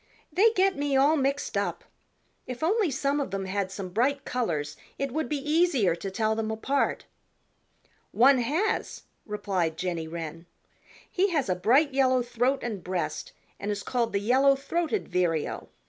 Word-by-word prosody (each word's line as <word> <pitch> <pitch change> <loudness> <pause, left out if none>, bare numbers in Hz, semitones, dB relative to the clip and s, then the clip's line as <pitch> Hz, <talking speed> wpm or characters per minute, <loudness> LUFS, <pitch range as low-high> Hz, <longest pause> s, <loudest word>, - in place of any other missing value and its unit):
"They 420 +5 +5
get 385 -1 +3
me 280 -1 0
all 285 +4 +5
mixed 275 -1 -1
up. - - -1 0.6
If 250 +3 -6
only 400 +2 +2
some 280 +2 0
of 280 - -2
them 195 -1 -3
had 190 0 -2
some 195 -1 -6
bright 265 +8 0
colors 155 -12 -2 0.2
it 275 -1 -2
would 315 +4 -2
be 300 - 0
easier 300 - +2
to 195 +3 -5
tell 215 +2 0
them 220 0 -2
apart." 265 +6 -1 1.1
"One 265 +2 +5
has," 330 - -1 0.2
replied 190 -6 -1
Jenny 170 -2 -3
Wren. 165 0 -7 0.6
"He 390 0 +1
has 295 - 0
a 185 - +2
bright 265 - +3
yellow 260 -2 +3
throat 245 +3 0
and 215 -6 -4
breast 185 - -3 0.3
and 205 - -4
is 205 -1 -2
called 240 -2 -1
the 200 - 0
Yellow 265 +6 +4
throated 335 +8 -2
Vireo. 175 -4 -1
250 Hz, 160 wpm, -27 LUFS, 195-285 Hz, 1.1 s, They